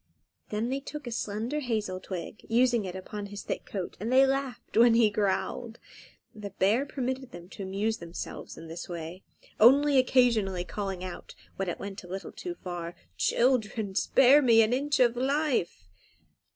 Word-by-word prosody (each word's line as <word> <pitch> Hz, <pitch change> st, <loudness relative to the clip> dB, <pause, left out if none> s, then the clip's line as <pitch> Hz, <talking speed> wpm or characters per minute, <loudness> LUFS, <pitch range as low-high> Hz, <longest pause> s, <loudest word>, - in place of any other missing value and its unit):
Then 215 Hz, +3 st, -2 dB
they 270 Hz, +1 st, -1 dB
took 290 Hz, +1 st, -8 dB
a 240 Hz, -, -5 dB
slender 225 Hz, +6 st, -2 dB
hazel 215 Hz, -8 st, -2 dB
twig, 185 Hz, +3 st, -7 dB
using 240 Hz, -2 st, +3 dB
it 180 Hz, -1 st, -6 dB
upon 205 Hz, +2 st, -6 dB
his 205 Hz, 0 st, -8 dB
thick -, -, -4 dB
coat, 190 Hz, -4 st, -5 dB
and 220 Hz, +5 st, -3 dB
they 265 Hz, +1 st, +6 dB
laughed 270 Hz, -3 st, -3 dB
when 230 Hz, 0 st, +6 dB
he 225 Hz, -2 st, +4 dB
growled. 215 Hz, +4 st, -1 dB, 0.6 s
The 210 Hz, -2 st, -7 dB
bear 210 Hz, +8 st, +1 dB
permitted 260 Hz, -1 st, -3 dB
them 175 Hz, -5 st, -11 dB
to -, -, -10 dB
amuse 200 Hz, +4 st, -1 dB
themselves 170 Hz, 0 st, -7 dB
in 165 Hz, -, -10 dB
this 165 Hz, +3 st, -7 dB
way, 170 Hz, +1 st, -6 dB, 0.4 s
only 275 Hz, +4 st, +6 dB
occasionally 230 Hz, -8 st, +2 dB
calling 195 Hz, -1 st, -4 dB
out, 185 Hz, -1 st, -8 dB, 0.2 s
when 195 Hz, -1 st, -2 dB
it -, -, -3 dB
went 200 Hz, 0 st, -7 dB
a -, -, -11 dB
little 190 Hz, +2 st, -6 dB
too 355 Hz, -1 st, -6 dB
far, 175 Hz, -, -6 dB, 0.2 s
"Children, 220 Hz, -, +1 dB
spare 270 Hz, +7 st, +5 dB
me 230 Hz, -4 st, +6 dB
an 220 Hz, +2 st, +1 dB
inch 280 Hz, +2 st, 0 dB
of 240 Hz, -2 st, +4 dB
life!" 265 Hz, -, 0 dB
220 Hz, 170 wpm, -28 LUFS, 190-255 Hz, 0.6 s, they